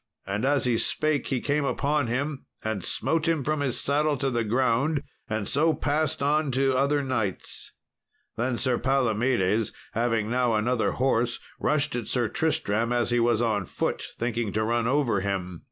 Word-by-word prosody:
And 100 +5 -2
as 140 -1 +2
he 120 -2 +2
spake 155 -3 0
he 130 - 0
came 145 +3 0
upon 145 0 0
him, 135 +4 -2 0.2
and 110 -4 -2
smote 160 -1 0
him 165 -4 +1
from 155 +2 0
his 140 -4 -1
saddle 145 +1 +1
to 135 0 -1
the 120 -1 0
ground, 130 +6 +1 0.3
and 110 -2 -2
so 155 +3 +2
passed 150 0 0
on 150 +1 +2
to 135 0 +2
other 140 +2 +2
knights. 110 -8 -3 0.6
Then 120 +1 -1
Sir 125 -1 0
Palomedes 115 -5 +1 0.2
having 115 -2 +1
now 120 -1 +1
another 115 +2 +1
horse 120 -2 +1 0.2
rushed 150 -1 +1
at 120 -4 -3
Sir 120 -3 +1
Tristram, 115 -7 0
as 120 -1 +1
he 120 - +3
was 120 0 +2
on 105 -4 0
foot, - - -2 0.2
thinking 115 -2 -1
to 110 - +1
run 115 +1 +1
over 130 -6 +2
him. 95 -3 -3
125 Hz, 170 wpm, -26 LUFS, 115-140 Hz, 0.6 s, he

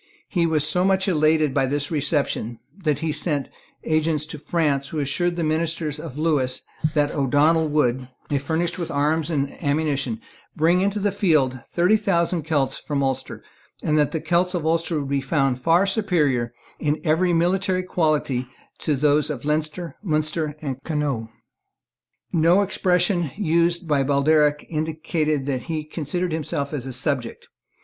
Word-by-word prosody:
He 170 -3 +1
was 155 -2 +2
so 180 +4 +2
much 190 +1 +2
elated 155 -4 +3
by 135 - +2
his 140 +2 -2
reception 140 -6 -1 0.2
that 155 -7 0
he 160 -1 0
sent 150 -2 -1 0.3
agents 155 -1 +1
to 155 -1 -8
France, 145 -4 0
who 155 - -6
assured 170 +5 0
the 170 - -2
ministers 155 -1 -1
of 150 -3 -8
Lewis 145 -5 0 0.3
that 145 -1 +3
the - - -7
O'Donnel 150 +4 +3
would, 130 -4 +1 0.2
if 140 -2 +1
furnished 170 +4 -1
with 170 - -3
arms 150 +3 0
and 140 -4 -1
ammunition, 145 +7 0 0.4
bring 170 +2 +3
into 200 +2 0
the 205 0 +1
field 155 -10 +2
thirty 180 +5 +3
thousand 170 -4 +1
Celts 145 -4 0
from 145 -2 -2
Ulster, 135 -1 -3 0.4
and 155 - +1
that 150 -1 +3
the 160 - -2
Celts 180 +3 +1
of 165 -3 -2
Ulster 165 0 +1
would 140 - -4
be 140 -1 0
found 135 -4 0
far 165 +6 +4
superior 160 - +1 0.3
in 150 0 0
every 170 +2 +2
military 185 +2 +1
quality 150 -8 0 0.3
to 150 - 0
those 150 +2 +3
of 145 -3 -5
Leinster, 155 +1 -2
Munster 155 -3 -1
and 135 -2 -4
Connaught. 145 -8 -2 1.0
No 170 +4 +4
expression 180 -3 +1
used 170 -2 +1
by 145 -3 +2
Baldearg 145 +2 +2
indicated 155 -2 -1
that 135 -3 -1
he 155 -2 -2
considered 160 +3 -3
himself 145 -2 -2
as 135 -3 -4
a - - -4
subject. 130 -2 -2
155 Hz, 160 wpm, -23 LUFS, 145-170 Hz, 1.0 s, far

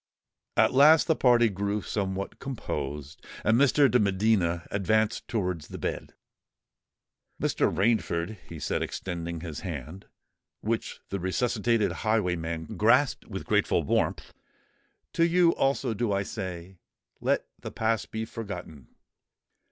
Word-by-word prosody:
At - - +4
last 150 +4 +7
the 160 - +2
party 120 -3 +5
grew 100 0 -2
somewhat 95 -1 -3
composed; 75 - -5 0.2
and 110 - +4
Mr. 140 +2 +5
de 125 -1 +3
Medina 95 -4 +1
advanced 110 +2 +1
towards 90 -8 -2
the - - -8
bed. - - -4 1.2
"Mr. - - +1
Rainford," 105 -2 0
he 85 - -7
said, 75 - -2
extending 85 -2 -4
his 80 -3 -6
hand, 85 +1 -7 0.5
which 115 +1 -3
the 100 - -3
resuscitated 110 +4 +1
highwayman 85 -7 -1
grasped - - +3
with - - -6
grateful - - +2
warmth, - - -1 0.8
"to 165 - +2
you 170 0 +4
also 135 -3 0
do 110 0 -1
I 100 0 +1
say, 95 -3 -6 0.4
'Let - - +1
the - - -6
past 110 0 -1
be 110 0 -3
forgotten.' 90 - -8
100 Hz, 125 wpm, -27 LUFS, 85-115 Hz, 1.2 s, last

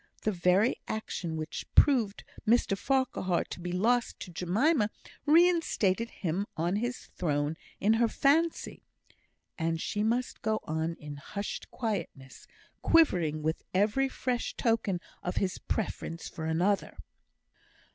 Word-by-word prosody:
The 215 - +2
very 185 +5 +3
action 175 -6 -3
which 155 +1 -5
proved 235 -8 +4 0.2
Mr 225 -3 +4
Farquhar 255 -7 0
to - - -8
be 175 0 -4
lost 230 +7 +1
to 180 - -7
Jemima 210 - +2 0.4
reinstated 310 - +3
him 185 +3 -2
on 175 +5 +1
his 245 +3 -4
throne 150 -2 0 0.2
in 210 +3 +4
her 235 - +5
fancy. 315 +8 +1 0.8
And 165 0 0
she 205 +5 -2
must 235 +3 0
go 220 0 0
on 160 +1 -2
in 150 -2 -8
hushed 200 +8 -5
quietness, 170 - -5 0.3
quivering 170 - +3
with 160 +1 -1
every 215 +8 +2
fresh 250 -2 -2
token 225 -6 +1 0.2
of 180 - -3
his 190 -2 -1
preference 170 -5 -3
for 160 - -6
another! 175 +5 0
200 Hz, 125 wpm, -30 LUFS, 170-240 Hz, 0.8 s, her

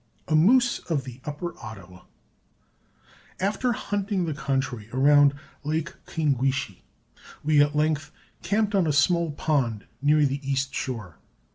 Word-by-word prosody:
[Illustration: 160 - -1
A 155 +2 +5
MOOSE 250 -2 +3
OF 150 -5 0
THE 130 0 -10
UPPER 155 +4 -4
OTTAWA.] 95 -4 -11 1.3
After 210 +6 0
hunting 200 -3 -2
the 160 - -2
country 135 -6 -2
around 145 +2 +5 0.3
Lake 150 -1 -2
Kwingwishe, 135 - -1 0.6
we 150 -1 +4
at 145 +1 +2
length 155 0 0 0.3
camped 205 +4 0
on 190 -4 +3
a 150 - +1
small 170 +4 +3
pond 135 -8 -1 0.2
near 150 +1 +4
the 140 0 -1
east 135 0 -1
shore. 110 - -5
145 Hz, 135 wpm, -25 LUFS, 135-165 Hz, 1.3 s, A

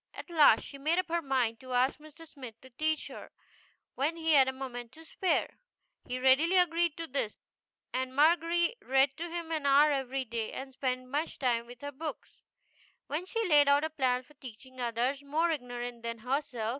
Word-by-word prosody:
At - - -9
last 310 -3 +6
she 280 - -10
made 315 +5 +1
up 370 -2 0
her 340 +1 0
mind 255 -6 0
to 255 -1 -8
ask 255 +4 +2
Mr. 310 +2 -14
Smith 255 -7 -11
to 260 - -16
teach 310 +5 -1
her - - -10 0.6
when 295 +5 -1
he 325 -1 0
had 270 -3 +6
a - - +1
moment 245 -3 -7
to 320 +3 -14
spare. 365 +3 -1 0.5
He 250 - -3
readily 270 +8 +4
agreed 340 -2 +2
to 330 - -4
do 270 - -19
this, 225 -6 -2 0.6
and 260 0 -2
Margery 340 - +3
read 270 -3 +2
to 340 +1 -5
him 335 -1 -5
an 305 -3 -1
hour 290 +2 +6
every 270 -1 -2
day, 230 -1 -4
and 265 0 -7
spent 255 -1 -2
much 295 +5 -2
time 235 -3 0
with 245 0 -13
her 285 0 -5
books. 305 +3 -8 0.7
Then 320 +6 -3
she 455 +1 -1
laid 295 -4 +6
out 285 +1 +4
a 315 - -2
plan 255 -4 0
for 300 - -21
teaching 260 -1 -11
others 245 +4 -1
more 310 +4 0
ignorant 245 -4 -5
than 230 0 -4
herself. 250 -1 -2
275 Hz, 200 wpm, -30 LUFS, 255-320 Hz, 0.7 s, last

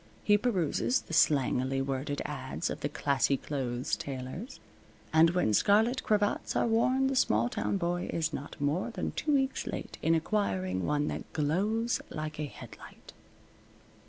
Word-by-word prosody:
He 205 - +5
peruses 205 - +1
the - - -10
slangily 135 -4 +3
worded 135 +1 -2
ads - - -3
of - - -5
the - - -2
"classy 140 -1 +1
clothes" 130 -4 -2
tailors, 135 - -6 0.5
and 160 +1 +6
when 175 -11 +1
scarlet 220 - +3
cravats 210 -1 0
are - - +2
worn 255 +4 +2
the 270 0 +1
small 120 - +3
town 105 -3 -1
boy 175 - -2
is 160 -1 -1
not 140 - -6
more 145 +10 0
than 235 - -3
two 300 - -2
weeks 270 -1 0
late - - -6
in 165 - +3
acquiring 95 - -1
one 150 0 +1
that - - -6
glows 205 +10 0
like 155 0 -5
a 150 - -1
headlight. 145 - -12
160 Hz, 155 wpm, -30 LUFS, 135-210 Hz, 0.5 s, and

